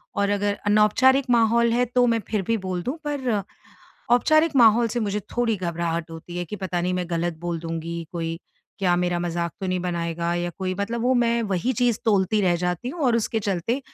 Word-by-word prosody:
और 200 Hz, 0 st, +1 dB
अगर 205 Hz, 0 st, +1 dB
अनौपचारिक 230 Hz, +6 st, +4 dB
माहौल 235 Hz, 0 st, +3 dB
है 245 Hz, +1 st, +2 dB
तो 245 Hz, +1 st, +2 dB
मैं 230 Hz, -1 st, +2 dB
फिर 215 Hz, -2 st, -1 dB
भी 230 Hz, -, +2 dB
बोल 185 Hz, -3 st, -3 dB
दूँ, 260 Hz, -, -3 dB
पर 270 Hz, -4 st, -1 dB, 0.8 s
औपचारिक 310 Hz, +5 st, +4 dB
माहौल 230 Hz, -1 st, +6 dB
से 240 Hz, +2 st, -2 dB
मुझे 210 Hz, -1 st, -1 dB, 0.2 s
थोड़ी 230 Hz, -3 st, +1 dB
घबराहट 170 Hz, -2 st, -3 dB
होती 165 Hz, +2 st, -9 dB
है 175 Hz, -, -2 dB
कि 210 Hz, +5 st, -7 dB
पता 180 Hz, -2 st, -2 dB
नहीं 180 Hz, +1 st, -1 dB
मैं 180 Hz, -1 st, -2 dB
गलत 170 Hz, -1 st, -1 dB
बोल 175 Hz, -1 st, -3 dB
दूँगी 165 Hz, 0 st, -4 dB
कोई? 165 Hz, -1 st, -3 dB, 0.4 s
क्या 180 Hz, -3 st, +2 dB
मेरा 175 Hz, 0 st, 0 dB
मज़ाक 170 Hz, -1 st, -2 dB
तो 190 Hz, -, -3 dB
नहीं 185 Hz, 0 st, 0 dB
बनाएगा? 170 Hz, -1 st, -2 dB
या 175 Hz, 0 st, -2 dB
कोई 185 Hz, -1 st, -2 dB
मतलब 205 Hz, +5 st, -3 dB
वो 255 Hz, +2 st, +3 dB
मैं 235 Hz, -1 st, +2 dB
वही 200 Hz, +3 st, -1 dB
चीज़ 240 Hz, -2 st, +1 dB
तोलती 205 Hz, -1 st, +2 dB
रह 180 Hz, -3 st, +2 dB
जाती 180 Hz, +6 st, -2 dB
हूँ 335 Hz, +6 st, -6 dB
और 235 Hz, -, +3 dB
उसके 225 Hz, 0 st, -1 dB
चलते 205 Hz, +6 st, -1 dB
200 Hz, 205 wpm, -24 LUFS, 175-235 Hz, 0.8 s, माहौल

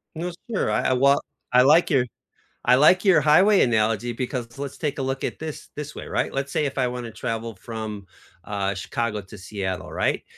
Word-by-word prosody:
No, 175 Hz, +3 st, -3 dB, 0.2 s
sure. 220 Hz, -, 0 dB
I -, -, +1 dB
I -, -, +3 dB
well, 140 Hz, +2 st, +4 dB, 0.3 s
I 125 Hz, -, +7 dB
like 150 Hz, +6 st, +5 dB
your 135 Hz, -6 st, +3 dB, 0.6 s
I 125 Hz, -, +6 dB
like 155 Hz, +7 st, +5 dB
your 180 Hz, -6 st, +6 dB
highway 185 Hz, +8 st, +5 dB
analogy 115 Hz, 0 st, +1 dB
because 120 Hz, -1 st, -4 dB
let's 140 Hz, -1 st, -5 dB
take 150 Hz, -2 st, -3 dB
a -, -, 0 dB
look 135 Hz, 0 st, -2 dB
at -, -, -3 dB
this, 155 Hz, -1 st, -7 dB
this 150 Hz, 0 st, -6 dB
way, -, -, -7 dB
right, -, -, -1 dB
let's 135 Hz, +1 st, -2 dB
say 150 Hz, -, 0 dB
if 140 Hz, -, -4 dB
I 130 Hz, -2 st, +2 dB
wanna 125 Hz, -1 st, -5 dB
travel 115 Hz, 0 st, -4 dB
from, 110 Hz, -1 st, -6 dB, 0.4 s
uh, 100 Hz, -1 st, -2 dB
Chicago 105 Hz, +3 st, -3 dB
to 95 Hz, +2 st, -13 dB
Seattle, 95 Hz, -1 st, -5 dB
right, -, -, 0 dB
125 Hz, 200 wpm, -24 LUFS, 110-150 Hz, 0.6 s, I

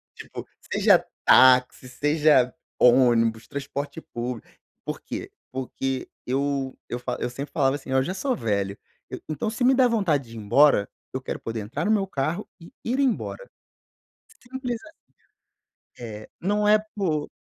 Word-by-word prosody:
tipo -, -, -9 dB, 0.2 s
seja -, -, +4 dB, 0.2 s
táxi, 130 Hz, 0 st, +6 dB
seja 145 Hz, -1 st, +3 dB, 0.3 s
ônibus, 120 Hz, -3 st, +4 dB
transporte 140 Hz, +2 st, -5 dB
público, 120 Hz, -3 st, -6 dB, 0.4 s
por -, -, -4 dB
quê? -, -, -6 dB, 0.2 s
Porque 130 Hz, 0 st, -3 dB, 0.2 s
eu 135 Hz, 0 st, -1 dB
eu 120 Hz, -, -2 dB
fa 125 Hz, 0 st, -4 dB
eu -, -, -2 dB
sempre 135 Hz, +4 st, -7 dB
falava 135 Hz, -2 st, +2 dB
assim 135 Hz, -, -8 dB
eu 130 Hz, 0 st, +3 dB
já 180 Hz, -, -3 dB
sou 255 Hz, +5 st, -1 dB
velho 100 Hz, -, -1 dB, 0.3 s
eu -, -, -6 dB
então 155 Hz, +7 st, -2 dB
se 225 Hz, +3 st, -3 dB
me 255 Hz, +2 st, +6 dB
der 255 Hz, -1 st, +5 dB
vontade 165 Hz, -, +1 dB
de 115 Hz, -, -11 dB
ir -, -, -6 dB
embora 115 Hz, 0 st, +4 dB, 0.3 s
eu 130 Hz, -, -3 dB
quero -, -, -5 dB
poder 115 Hz, 0 st, -4 dB
entrar 115 Hz, +10 st, -4 dB
no 215 Hz, -, +2 dB
meu 200 Hz, -3 st, +2 dB
carro 155 Hz, 0 st, -2 dB
e 170 Hz, -, -14 dB
ir 250 Hz, +4 st, -1 dB
embora. 280 Hz, -, -1 dB, 0.9 s
Simples 250 Hz, -2 st, -4 dB
a 315 Hz, -, -13 dB, 1.1 s
É, 110 Hz, -3 st, -8 dB
não 205 Hz, +3 st, +1 dB
é 215 Hz, 0 st, +6 dB, 0.2 s
por 160 Hz, -8 st, -1 dB
140 Hz, 160 wpm, -25 LUFS, 125-195 Hz, 1.1 s, táxi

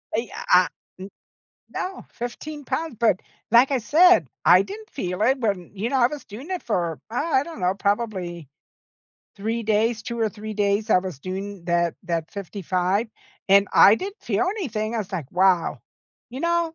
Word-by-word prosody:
I -, -, +2 dB
eh -, -, -7 dB
uh 180 Hz, 0 st, +7 dB, 0.3 s
N 190 Hz, +1 st, -8 dB, 0.6 s
No, 375 Hz, +1 st, -5 dB
15 290 Hz, +5 st, -7 dB
pounds. 320 Hz, -3 st, -3 dB
But, 225 Hz, -6 st, +3 dB, 0.3 s
like 240 Hz, +4 st, +6 dB
I 270 Hz, -, +3 dB
said, 350 Hz, +10 st, +5 dB, 0.2 s
I -, -, +7 dB
didn't 430 Hz, +2 st, -8 dB
feel 180 Hz, -6 st, -4 dB
it 260 Hz, +5 st, +3 dB
when, 200 Hz, -7 st, -2 dB
you 210 Hz, +4 st, -2 dB
know, 270 Hz, -, +1 dB
I 240 Hz, -, +5 dB
was 295 Hz, +2 st, -8 dB
doing 245 Hz, -, -10 dB
it 365 Hz, -, -3 dB
for, 170 Hz, -8 st, -1 dB
uh, -, -, -6 dB
I 290 Hz, -1 st, +1 dB
don't 325 Hz, -5 st, -9 dB
know, 180 Hz, 0 st, +1 dB
probably 195 Hz, -, -2 dB, 0.9 s
3 225 Hz, +3 st, -2 dB
days, 220 Hz, +1 st, +1 dB
2 235 Hz, 0 st, -5 dB
or 225 Hz, -1 st, +2 dB
3 215 Hz, +1 st, -7 dB
days. 205 Hz, +1 st, 0 dB
I -, -, +6 dB
was 180 Hz, -6 st, -6 dB
doing 190 Hz, +3 st, -6 dB
that 170 Hz, -1 st, +1 dB
that 165 Hz, -2 st, -2 dB
55, 195 Hz, +1 st, -1 dB, 0.4 s
and 200 Hz, 0 st, +5 dB
I 200 Hz, -, +8 dB
didn't 390 Hz, -, -6 dB
feel -, -, 0 dB
anything. 220 Hz, -, -3 dB
I -, -, 0 dB
was 205 Hz, -2 st, -5 dB
like, 160 Hz, -8 st, -4 dB
"Wow. 180 Hz, -2 st, +2 dB, 0.5 s
You 255 Hz, +3 st, -6 dB
know, 340 Hz, 0 st, 0 dB
215 Hz, 185 wpm, -24 LUFS, 185-255 Hz, 0.9 s, I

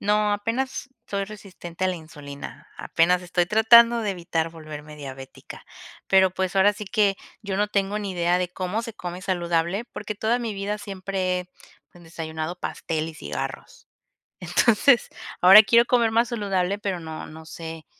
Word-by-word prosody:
No, 210 Hz, 0 st, +2 dB
apenas 240 Hz, +6 st, -3 dB, 0.2 s
soy 200 Hz, -1 st, -2 dB
resistente 190 Hz, -4 st, -7 dB
a -, -, +2 dB
la 185 Hz, -, -2 dB
insulina, 145 Hz, -3 st, -10 dB
apenas 180 Hz, +2 st, +2 dB
estoy 175 Hz, 0 st, 0 dB
tratando 230 Hz, +3 st, +6 dB
de 210 Hz, -, -1 dB
evitar 170 Hz, -3 st, -2 dB
volverme 155 Hz, -2 st, -10 dB
diabética, 135 Hz, -2 st, -10 dB, 0.4 s
pero 190 Hz, -1 st, +5 dB
pues, 185 Hz, +1 st, -3 dB
ahora 200 Hz, +2 st, +5 dB
sí 210 Hz, -, -7 dB
que, 200 Hz, 0 st, +1 dB, 0.3 s
yo 200 Hz, -2 st, -3 dB
no 210 Hz, +1 st, +1 dB
tengo 200 Hz, 0 st, 0 dB
ni 205 Hz, -2 st, -4 dB
idea 175 Hz, 0 st, +1 dB
de 180 Hz, -1 st, -1 dB
cómo 185 Hz, +5 st, -3 dB
se 230 Hz, -, -7 dB
come 180 Hz, +1 st, -7 dB
saludable 175 Hz, +2 st, -1 dB
porque 210 Hz, -, -6 dB
toda 220 Hz, +4 st, 0 dB
mi 235 Hz, -3 st, -3 dB
vida 200 Hz, +1 st, -3 dB
siempre 190 Hz, -2 st, -2 dB
he, 180 Hz, -, -10 dB, 0.5 s
pues, 175 Hz, -1 st, -17 dB
desayunado 160 Hz, +1 st, -5 dB
pastel 160 Hz, -1 st, -3 dB
y 160 Hz, -, -9 dB
cigarros. -, -, -7 dB, 0.5 s
Entonces, 235 Hz, +2 st, +3 dB, 0.3 s
ahora 190 Hz, +4 st, +10 dB
quiero 235 Hz, +3 st, +5 dB
comer 235 Hz, -2 st, +2 dB
más 230 Hz, +1 st, +2 dB
saludable, 200 Hz, -4 st, -1 dB
pero 195 Hz, -3 st, -3 dB
no 160 Hz, -1 st, -7 dB
no 160 Hz, +1 st, -12 dB
sé, 160 Hz, 0 st, -8 dB
190 Hz, 165 wpm, -24 LUFS, 170-210 Hz, 0.5 s, ahora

